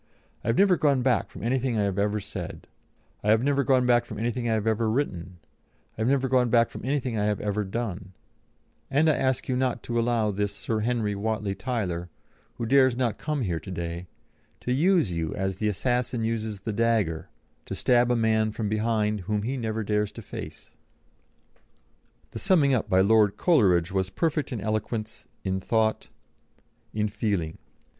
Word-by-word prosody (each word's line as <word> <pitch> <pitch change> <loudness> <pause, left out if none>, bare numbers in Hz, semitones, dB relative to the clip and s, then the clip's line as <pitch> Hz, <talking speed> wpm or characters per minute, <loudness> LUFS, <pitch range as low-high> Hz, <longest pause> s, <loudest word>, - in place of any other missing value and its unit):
I - - -7
have 115 - +2
never 195 -3 +5
gone 140 -5 +2
back 125 -5 +1
from - - -10
anything 125 0 0
I 105 - +2
have 100 -1 -1
ever 105 +1 +1
said; - - -7 0.6
I 105 - 0
have 110 +2 +4
never 140 0 +2
gone 130 -1 +3
back 120 -1 +4
from 110 - -8
anything 120 +2 -1
I 110 - +2
have 110 -1 -1
ever 110 0 +1
written; 95 -8 -2 0.6
I - - -6
have 110 - +1
never 135 0 +2
gone 125 -2 +3
back 115 0 +3
from - - -8
anything 130 -4 -1
I 105 - +1
have 105 -2 0
ever 105 0 -1
done; 95 -3 -4 0.8
and 145 +4 +3
I 155 - +5
ask 130 -2 0
you 130 - 0
not 130 -1 -1
to 120 -1 -1
allow 115 -2 +1
this 100 0 -2
Sir 110 +1 -2
Henry 110 -2 0
Whatley 105 0 -2
Tyler, 95 -10 -3 0.5
who 115 - -3
dares 130 0 +4
not 120 -3 -1
come 150 -4 -2
here 85 -5 -1
to 80 - -11
day, 85 0 -5 0.5
to 125 - -1
use 165 - +3
you 85 -2 -2
as 95 -1 -2
the 110 - -1
assassin 120 +3 0
uses 110 -3 -2
the 110 +1 -3
dagger, 110 -8 0 0.4
to - - -4
stab 120 -1 +3
a 125 - +3
man 110 -1 +2
from 105 -1 -3
behind 110 -1 0
whom 105 +2 -2
he 130 +5 -2
never 110 -3 -2
dares 105 0 0
to - - -9
face." - - -9 1.6
The - - -6
summing 160 -8 +3
up 125 - 0
by 95 0 +4
Lord 105 0 +4
Coleridge 95 - +3
was 95 -1 0
perfect 155 - -1
in 115 -5 -3
eloquence, 110 +1 -3 0.2
in 95 -1 -1
thought, 110 +2 0 0.8
in 105 0 0
feeling. 100 -7 -2
110 Hz, 185 wpm, -26 LUFS, 105-125 Hz, 1.6 s, never